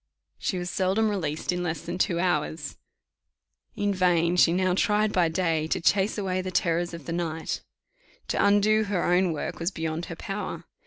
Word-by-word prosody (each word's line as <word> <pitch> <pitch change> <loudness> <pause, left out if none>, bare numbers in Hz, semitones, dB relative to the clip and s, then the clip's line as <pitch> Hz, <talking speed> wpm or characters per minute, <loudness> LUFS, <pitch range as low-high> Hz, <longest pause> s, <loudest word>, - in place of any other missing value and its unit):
She 185 - -1
was 175 0 -3
seldom 195 +4 +1
released 160 -5 -2
in 180 0 -2
less 170 -2 -2
than 175 +2 -5
two 175 -3 +1
hours. 165 -3 -1 1.0
In 205 0 0
vain 175 -2 +2
she 175 -1 +5
now 185 +1 +2
tried 210 +2 +2
by 175 -3 +3
day 160 -2 0
to - - 0
chase 195 +5 +2
away 185 -2 -1
the 185 - -4
terrors 175 -2 0
of 165 -4 -10
the 165 - -4
night: 165 -2 -3 0.7
to - - +1
undo 205 +2 +4
her 195 -3 -1
own 180 0 +3
work 155 - -4
was 170 +1 0
beyond 160 -2 -3
her 165 - -7
power. 195 -3 -5
180 Hz, 180 wpm, -26 LUFS, 165-195 Hz, 1.0 s, she